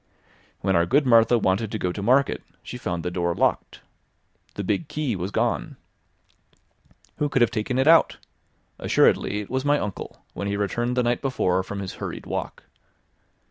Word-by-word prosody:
When 95 -1 +1
our 85 0 +3
good 145 +3 +3
Martha 115 -1 +5
wanted 100 0 0
to 110 - -2
go 90 -3 -1
to 100 - -6
Market, 130 +6 +2 0.2
she 125 - -8
found 90 -6 -3
the 90 - -2
door 85 -1 -1
locked. - - -1 0.7
The 100 - -3
big 150 - -1
key 150 -6 -2
was 90 +1 -3
gone. - - -1 1.4
Who 150 - 0
could 135 -3 +3
have 120 - +2
taken 120 +2 -2
it 135 +2 +2
out? 165 0 +5 0.6
Assuredly, 105 - +2
it 100 - -10
was 130 0 -1
my 145 0 +3
uncle, 105 -8 -6
when 100 - -4
he 100 0 -1
returned 120 +5 -1
the 125 - +3
night 120 0 0
before 95 -9 +1
from 100 +1 -6
his 95 - -5
hurried - - -5
walk. - - -5
110 Hz, 180 wpm, -24 LUFS, 95-130 Hz, 1.4 s, Martha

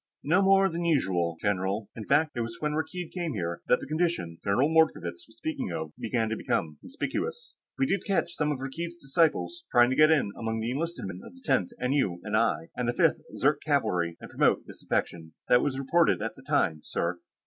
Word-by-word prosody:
"No 175 +7 +3
more 195 0 +5
than 170 -1 -3
usual, 95 - +1
general. 100 +1 -1
In 110 - -7
fact, 155 0 +3
it 120 - -1
was 115 0 -5
when 150 0 -1
Rakkeed 165 +2 -3
came 175 -5 -3
here 85 -3 -3
that 125 - +4
the - - -5
condition 155 - -1
General 105 +8 +3
Mordkovitz 160 - +1
was - - -20
speaking 285 -7 -3
of 80 -1 -4
began 115 0 -1
to 110 - -1
become 75 -7 -2
conspicuous. 465 - -4 0.2
We 270 - +2
did 200 -6 0
catch 175 -3 0
some 150 -1 0
of 145 - -1
Rakkeed's 165 +6 -5
disciples 165 - +1
trying 120 +1 +5
to - - +1
get 155 +2 +6
in 145 -10 +3
among 115 -1 -3
the 115 +2 -2
enlisted 165 - -3
men 95 -1 -6
of - - -12
the 265 - -18
Tenth 95 - +2
N.U.N.I. 105 - 0
and 125 - -2
the 120 - +1
Fifth - - +3 0.2
Zirk - - +2
Cavalry 85 -1 0
and - - -11
promote - - +2
disaffection. 80 -2 -3 0.2
That 125 - +6
was 135 -2 -1
reported 165 +6 +3
at - - -3
the - - -14
time, 80 -2 +1
sir." 85 +1 -2
135 Hz, 205 wpm, -28 LUFS, -, 0.2 s, get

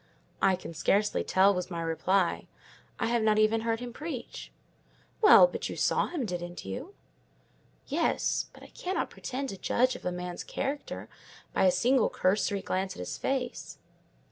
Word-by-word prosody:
"I 195 -1 +4
can 180 -2 -9
scarcely 205 +6 +1
tell," 195 +2 +4
was 180 -1 -3
my 170 -2 -4
reply: 165 +3 0 0.5
"I - - +1
have 235 0 +1
not 215 -1 +3
even 215 +1 +3
heard 225 0 -1
him 245 -1 -6
preach." 295 -4 -7 0.7
"Well, 430 +3 +9
but - - -3
you - - -5
saw - - +2
him, 300 -8 -3
didn't 175 -2 -5
you?" 275 +12 -6 0.9
"Yes, 320 +4 0
but - - -15
I - - -13
cannot 370 +3 -3
pretend 270 +1 -4
to 195 - -6
judge 255 +6 +1
of - - -10
a 180 - -1
man's 180 0 -5
character 285 +1 -4 0.5
by - - +3
a 185 - +6
single 250 +4 +3
cursory 200 +1 +1
glance 190 +1 -2
at - - -11
his 90 - -5
face." 255 -2 -3
215 Hz, 170 wpm, -29 LUFS, 185-255 Hz, 0.9 s, Well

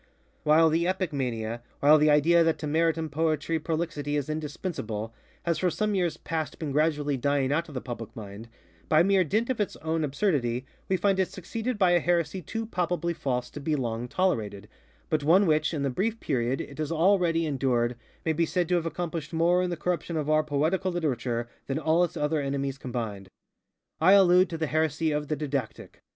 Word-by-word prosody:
While 160 +2 +5
the 170 +2 +1
epic 185 -3 -1
mania, 120 -4 -3 0.2
while 150 +2 +6
the 150 +1 +4
idea 165 +3 +5
that 165 -1 +1
to - - -5
merit 165 +2 +2
in 160 -1 -2
poetry 160 +1 0
prolixity 155 -2 -2
is 145 +1 -1
indispensable, 145 - -4 0.3
has 170 -2 0
for 180 - +2
some 210 +4 -1
years 180 -4 0
past 160 -3 -4
been 155 -3 -4
gradually 145 -1 +1
dying 140 0 +1
out 165 +4 0
of 145 - -11
the 130 - -3
public 120 -3 -7
mind, 105 +1 -9 0.4
by 155 +1 +5
mere 195 0 +4
dint 220 - 0
of 235 - -1
its 205 - -2
own 160 0 -2
absurdity, 135 - 0 0.2
we 190 - +2
find 195 0 +1
it 190 - +2
succeeded 225 +6 -4
by 185 -3 +4
a 175 - +5
heresy 170 +1 0
too 225 +8 -4
palpably 175 -4 -1
false 125 -5 -2
to - - -7
be 150 +2 -1
long 120 -3 -2
tolerated, 110 - -1 0.4
but 155 -2 0
one 180 +7 +5
which, 155 -2 +2
in 150 -4 -2
the 140 - +1
brief 220 - -1
period 130 -2 -1
it 140 - -9
has 155 0 -2
already 165 -1 +3
endured, 125 -4 0 0.3
may 160 - +2
be 165 +2 +1
said 180 0 0
to - - +1
have 165 -1 -2
accomplished 165 -2 -4
more 170 +2 +3
in 180 - 0
the 175 - -3
corruption 170 0 -2
of 150 -2 -2
our 155 0 +4
Poetical 155 +6 0
Literature 125 -8 -2 0.2
than 135 - -1
all 160 +3 +2
its 175 - -2
other 150 +1 0
enemies 140 -1 -2
combined. 115 -7 -5 0.7
I 185 +5 +6
allude 185 -1 +6
to 165 - -4
the 160 - -1
heresy 155 +1 0
of 150 0 -2
_The 155 - -1
Didactic. 140 -5 -4
155 Hz, 200 wpm, -27 LUFS, 140-175 Hz, 0.7 s, while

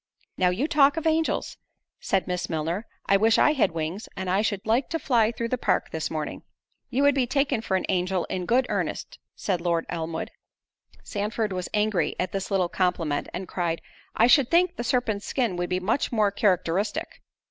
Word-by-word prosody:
"Now 180 -1 +3
you 215 +12 0
talk 295 -2 +4
of 325 - -3
angels," 320 0 0 0.4
said 195 - 0
Miss 180 -1 -3
Milner, 165 +7 -2 0.2
"I 200 - +4
wish 220 +2 +4
I 300 - +5
had 275 - +3
wings; 165 +6 -4
and 185 -1 -2
I 195 +2 +3
should 205 -3 -2
like 235 +4 +1
to 330 - -1
fly 235 -8 +2
through 235 0 -4
the 255 - -1
park - - 0
this 160 -1 -3
morning." 155 -2 -4 0.5
"You 265 +2 +1
would 285 0 +5
be 260 -2 +1
taken 275 -3 +1
for 190 -4 0
an - - -3
angel 185 -1 0
in 180 -1 -4
good 250 +2 +3
earnest," - - -3 0.2
said 185 -4 -2
Lord 170 -1 0
Elmwood. 165 -1 -4 0.7
Sandford 210 0 -2
was 180 -1 -4
angry 210 -2 +1
at 180 -1 -1
this 195 -1 -3
little 190 -3 +2
compliment, 175 -5 -1
and 185 +1 -5
cried, 170 -2 -2 0.4
"I 225 - +5
should 250 +1 +5
think 350 +1 +3
the 240 - -4
serpent's 225 -5 0
skin 235 -8 0
would 175 0 -2
be 185 - 0
much 215 +9 0
more 215 -4 +2
characteristic." 195 -1 0
200 Hz, 195 wpm, -26 LUFS, 180-245 Hz, 0.7 s, I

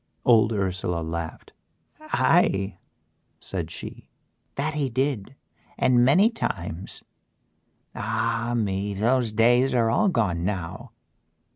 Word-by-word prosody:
Old 115 -2 +5
Ursela 90 -4 -2
laughed. 80 0 -6 0.5
"Aye," 95 +1 +1 0.6
said - - -5
she, - - -9 0.5
"that 150 +3 -1
he 145 -3 -1
did 130 -2 -2 0.4
and 125 -1 +4
many 185 - +5
times. 85 - -5 0.9
Ah! 115 +2 -1
me, 100 -2 -1
those 120 +3 +1
day's 120 +4 +3
are 115 -2 +2
all 210 - +3
gone 95 - 0
now." 90 -3 -4
115 Hz, 105 wpm, -25 LUFS, 95-125 Hz, 0.9 s, Old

